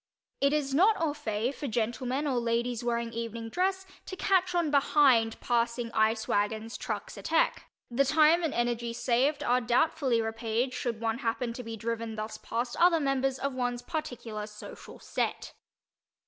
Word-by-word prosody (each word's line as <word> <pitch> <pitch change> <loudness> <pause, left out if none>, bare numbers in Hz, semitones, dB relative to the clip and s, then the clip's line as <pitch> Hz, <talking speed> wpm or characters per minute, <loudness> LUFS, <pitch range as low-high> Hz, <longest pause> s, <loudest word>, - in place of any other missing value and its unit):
It 280 0 +3
is 290 -2 0
not 395 +8 +5
au 320 -3 0
fait 235 -4 -2
for 285 - -5
gentlemen 245 +4 -1
or 260 -4 +1
ladies 235 0 -1
wearing 235 -1 -1
evening 230 0 -5
dress 380 - 0 0.2
to 375 - -5
"catch 370 -1 +2
on 335 -4 +1
behind" 270 -5 +4
passing 235 0 0
ice 220 0 +1
wagons, 215 +2 -1
trucks, - - -5
etc.; - - +2 0.4
the 260 +4 +3
time 310 +4 +5
and 325 -4 0
energy 240 -1 -1
saved 265 +5 +1
are 250 +1 +2
doubtfully 250 +1 +2
repaid 225 +3 -1
should 235 -3 -3
one 225 +1 -1
happen 235 -1 -2
to 250 - -6
be 225 -1 -7
driven 230 0 -3
thus 215 0 -5
past 240 +1 -3
other 345 -1 +5
members 270 -2 0
of 275 0 -2
one's 245 -1 -2
particular 235 -9 -5
social 210 0 -11
"set." - - -3
240 Hz, 160 wpm, -29 LUFS, 230-285 Hz, 0.4 s, not